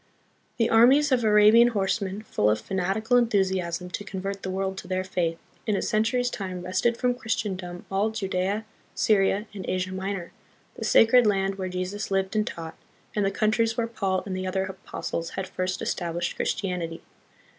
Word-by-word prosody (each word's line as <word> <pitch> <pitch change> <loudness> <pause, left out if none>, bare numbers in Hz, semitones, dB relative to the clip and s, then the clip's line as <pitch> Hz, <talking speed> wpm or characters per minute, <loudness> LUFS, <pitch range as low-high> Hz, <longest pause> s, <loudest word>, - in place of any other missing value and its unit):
The 230 - +3
armies 265 +6 +6
of 250 -2 +3
Arabian 215 +2 +7
horsemen, 200 -2 -1
full 105 - +1
of 110 0 +2
fanatical 195 - 0
enthusiasm 190 -6 0
to 205 - -4
convert 195 0 -5
the 190 - -4
world 190 0 -2
to - - -10
their 185 0 -1
faith, 175 -3 -1 0.3
in 210 - +2
a - - 0
century's 240 +3 +1
time 185 -4 -5
wrested 185 +6 +1
from 250 -1 +1
Christendom 190 -7 -4
all 200 +3 +1
Judea, 200 0 -2 0.3
Syria, 200 0 +2
and 195 -2 -6
Asia 185 0 -1
Minor, 190 -2 -4 0.4
the - - -6
sacred 230 +1 +6
land 195 -1 +1
where 185 -1 -2
Jesus 185 +3 -4
lived 195 +1 0
and 215 0 +1
taught, 165 -1 -6 0.4
and 210 - +1
the 195 - +2
countries 220 +2 +1
where 235 - +1
Paul 195 -5 -1
and 190 -2 -4
the 185 0 -3
other 190 +1 0
apostles 185 -3 -5
had 190 - -2
first 185 +1 -3
established 175 -1 -2
Christianity. 175 -4 -2
195 Hz, 170 wpm, -26 LUFS, 185-220 Hz, 0.4 s, Arabian